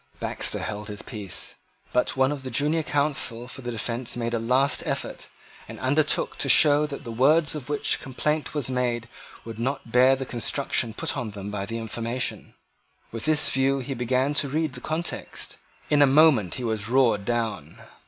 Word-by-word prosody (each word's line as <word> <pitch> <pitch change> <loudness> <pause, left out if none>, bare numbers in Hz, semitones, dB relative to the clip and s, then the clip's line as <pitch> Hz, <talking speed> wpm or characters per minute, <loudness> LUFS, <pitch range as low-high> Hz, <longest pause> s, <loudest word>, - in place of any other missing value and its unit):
Baxter - - 0
held 105 -1 -5
his 105 0 -6
peace. 105 -6 -4 0.4
But 125 +2 +1
one 130 +1 +3
of 145 -2 -4
the 130 - -6
junior 150 +6 +1
counsel 140 -6 -1
for 130 - -7
the 120 - -5
defence 120 +2 -3
made 115 0 -2
a 115 - 0
last 130 +5 +2
effort, - - -4 0.4
and - - -9
undertook 145 +4 0
to 140 - -1
show 150 +2 +6
that 140 -2 -7
the 115 - -6
words 145 +6 +4
of 145 -3 -7
which 145 - 0
complaint 150 +4 -2
was 145 -5 +1
made 125 -2 -1 0.4
would 115 -1 -8
not 125 -1 -3
bear 130 +2 +5
the 135 0 -5
construction 120 -1 -1
put - - -2
on 115 - -3
them 100 +1 -6
by 100 -1 -4
the 115 - -4
information. 115 +2 -3 0.6
With 115 +2 -5
this 155 -1 +5
view 135 +1 +2
he 135 +1 -4
began 130 +3 0
to 140 - -4
read 155 0 -1
the 125 - -8
context. 160 +2 -4 0.3
In 145 -1 +4
a 145 - +7
moment 135 - +4
he 125 - -5
was 110 -2 -1
roared 120 -5 +3
down. 110 -9 -3
125 Hz, 185 wpm, -25 LUFS, 115-145 Hz, 0.6 s, a